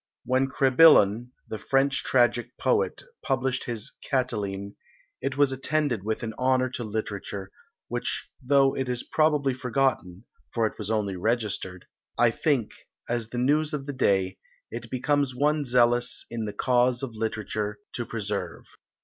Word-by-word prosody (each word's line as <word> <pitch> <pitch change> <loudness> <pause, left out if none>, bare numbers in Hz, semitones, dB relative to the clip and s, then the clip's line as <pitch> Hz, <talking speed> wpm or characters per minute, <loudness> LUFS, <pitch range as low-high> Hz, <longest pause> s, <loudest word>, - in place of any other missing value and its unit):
When 130 +1 +2
Crebillon, 130 -4 +5 0.2
the 110 - -5
French 135 +1 +1
tragic 120 -1 +2
poet, - - 0 0.2
published 130 -1 -1
his 120 +1 -5
Catiline, 100 -7 -2 0.5
it 135 0 -2
was 145 -2 +4
attended 135 -3 0
with 110 +2 -2
an 110 -1 -3
honour 130 0 +2
to 125 - -4
literature, 100 -3 -5 0.4
which - - -2
though 135 +1 +3
it 130 -1 -2
is 125 -1 -2
probably 150 -4 +2
forgotten, 125 -6 -1 0.3
for 115 -2 +2
it 110 - -1
was 105 -1 -5
only 105 -3 0
registered, 100 -3 -2 0.3
I 120 -1 +4
think, 130 -5 0 0.4
as 120 -2 -2
the 120 - -6
news 150 +5 +2
of 140 -2 -5
the 145 - -4
day, 95 -7 +1 0.3
it 120 0 -7
becomes 135 +1 0
one 150 +2 +1
zealous 120 -1 +2
in 115 -2 -3
the 105 - -4
cause 125 +3 +2
of 130 - -3
literature 110 -1 -3 0.2
to 120 - -3
preserve. 105 -6 -4
120 Hz, 150 wpm, -26 LUFS, 110-135 Hz, 0.5 s, Crebillon